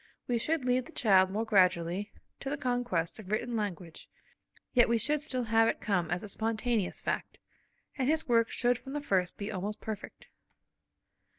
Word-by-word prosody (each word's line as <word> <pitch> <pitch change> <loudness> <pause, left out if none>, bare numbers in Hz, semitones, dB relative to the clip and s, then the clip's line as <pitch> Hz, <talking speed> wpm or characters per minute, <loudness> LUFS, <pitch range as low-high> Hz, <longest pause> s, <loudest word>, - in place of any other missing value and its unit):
We 240 -1 +1
should 310 +2 0
lead 250 0 +1
the - - -12
child 190 -4 +4
more 215 +4 -1
gradually 185 -1 +2 0.3
to 270 - -4
the 290 - -2
conquest 245 - -1
of 205 -2 -9
written 235 +2 -1
language, 180 -6 -5 0.6
yet 240 -2 +5
we 235 - +3
should 290 +6 0
still 260 -5 -1
have 225 0 +4
it - - 0
come 180 -5 0
as 175 +1 -2
a - - -6
spontaneous 220 0 -1
fact, - - -3 0.6
and 260 +1 +1
his 315 0 +1
work 230 -2 +3
should 245 -1 +1
from 270 - -9
the 295 - -2
first 185 -9 0
be 205 +1 -4
almost 205 +2 -4
perfect. 215 -2 -7
225 Hz, 180 wpm, -31 LUFS, 195-245 Hz, 0.6 s, yet